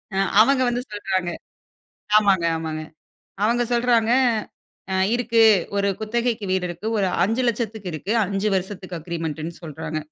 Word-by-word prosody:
ஆ - - -1 0.2
அவங்க 265 +2 +4
வந்து 245 +1 -1
சொல்றாங்க 190 -3 -2 0.9
ஆமாங்க, 195 -5 +4
ஆமாங்க. 160 -1 -4 0.6
அவங்க 240 +2 +2
சொல்றாங்க, 235 -1 +2 0.8
ஆ. - - 0 0.2
இருக்கு 235 -1 +2 0.3
ஒரு 200 0 +1
குத்தகைக்கு 230 0 -1
வீடு 185 -1 0
இருக்கு. 175 +5 -7
ஒரு 195 - +2 0.2
500000க்கு 225 -3 -1
இருக்கு. 190 +7 -3
5 200 +2 -1
வருஷத்துக்கு 185 -2 -5
அக்ரிமெண்டுன்னு 165 -1 -4
சொல்றாங்க. 160 0 -5
200 Hz, 125 wpm, -23 LUFS, 175-230 Hz, 0.9 s, அவங்க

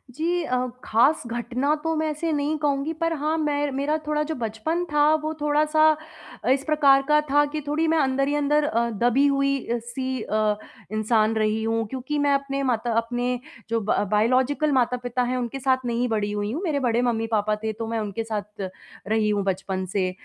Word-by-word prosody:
जी 340 +3 0
अ, 255 -5 0 0.3
खास 250 +8 +3
घटना 240 +4 -1
तो 325 0 0
मैं 315 0 0
ऐसे 320 +2 -2
नहीं 295 +1 0
कहूँगी 290 +1 0
पर 330 0 +1
हाँ, 310 +1 -1
मैं 290 -2 0
मेरा 280 +3 0
थोड़ा 300 0 +1
जो 320 - -1
बचपन 235 +9 -2
था 295 +1 +5
वो 310 - -1
थोड़ा-सा 305 +1 +3 0.6
इस 270 +1 +2
प्रकार 285 -3 +5
का 300 0 +6
था 290 +1 +5
कि 305 0 -3
थोड़ी 310 +3 +1
मैं 320 +1 +2
अंदर 275 -2 +1
ही 290 - 0
अंदर 295 +1 +2
अ, 235 -6 +1
दबी 240 +5 +2
हुई 275 0 +2
अ, 240 - 0
सी 255 +2 -4
अ, 215 -1 0 0.3
इंसान 215 0 +2
रही 215 0 +1
हूँ 225 0 0
क्योंकि 265 +5 -3
मैं 285 0 +3
अपने 275 0 -1
माता 240 -2 0
अपने 245 +2 -1 0.3
जो 230 0 +1
ब 210 - 0 0.2
बायोलॉजिकल 255 +8 +2
माता-पिता 250 -1 0
हैं 250 +1 -1
उनके 250 +2 -3
साथ 260 0 +2
नहीं 240 +1 0
बड़ी 210 -2 -1
हुई 205 0 -2
हूँ। 300 +8 -3
मेरे 310 -6 0
बड़े 240 -2 +1
मम्मी-पापा 225 -3 0
थे 220 - 0
तो 225 +1 -5
मैं 225 0 -2
उनके 210 +1 -3
साथ 210 -3 -5 0.4
रही 215 0 +1
हूँ 205 -1 +1
बचपन 190 0 -2
से 185 -2 +1
255 Hz, 195 wpm, -24 LUFS, 225-295 Hz, 0.6 s, का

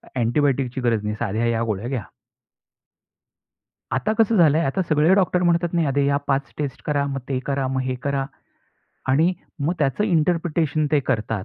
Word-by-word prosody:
"अँटिबायोटिकची 130 +1 0
गरज 115 -3 +1
नाही 105 0 -2
आहे, 120 - 0
साध्या 110 +2 -1
ह्या 115 -1 +1
गोळ्या 110 0 -3
घ्या." 130 -5 -2 1.9
आता 135 +11 0
कसं 225 0 +3
झालंय, 160 -3 +4
आता 150 +7 0
सगळे 155 +3 +4
डॉक्टर 180 -2 +2
म्हणतात 170 -1 +2
नाही 170 -3 +1
अ, 140 - 0
"या 140 - +2
5 135 0 -1
टेस्ट 145 -3 -4
करा, 145 -2 +1
मग 135 -1 -3
ते 135 -2 0
करा, 140 -1 -1
मग 130 0 -1
हे 130 0 -2
करा." 140 -1 -1 0.8
आणि 155 +7 +3 0.3
मग 175 - +1
त्याचं 145 +8 +1
इंटरप्रिटेशन 160 -4 +1
ते 150 - +4
करतात. 115 -6 -2
140 Hz, 175 wpm, -22 LUFS, 130-165 Hz, 1.9 s, झालंय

